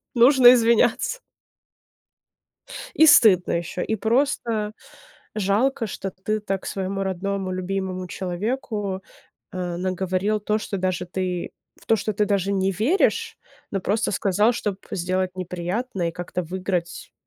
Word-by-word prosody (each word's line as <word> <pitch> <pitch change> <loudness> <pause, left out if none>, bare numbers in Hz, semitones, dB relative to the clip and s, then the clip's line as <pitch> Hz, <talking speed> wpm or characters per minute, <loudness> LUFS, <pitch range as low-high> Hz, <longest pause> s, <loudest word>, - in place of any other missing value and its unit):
нужно 245 0 +8
извиняться. 235 - +2 1.8
И 315 - +7
стыдно 205 - +6
ещё, 170 +1 -3
и 220 - -1
просто 225 -2 0 0.6
жалко, 215 +4 +1
что 195 -1 -5
ты 215 +4 -3
так 195 -2 -4
своему 195 0 -3
родному, 190 0 -2
любимому 185 0 -3
человеку, 200 +2 -3 0.5
э, 180 -2 -3
наговорил 185 +3 -1
то, 210 +1 0
что 210 - -4
даже 185 -1 -2
ты 180 0 -3 0.3
в - - -21
то, 225 - +4
что 215 +1 -2
ты 210 - +2
даже 200 -1 0
не 195 -1 +1
веришь, 245 - +1 0.3
но 195 - -2
просто 210 +5 0
сказал, 205 +3 +2
чтоб 205 -5 -3
сделать 185 +1 -2
неприятное 180 +2 -3
и - - -5
как-то 180 +1 -4
выиграть 180 0 -4
195 Hz, 130 wpm, -23 LUFS, 185-215 Hz, 1.8 s, нужно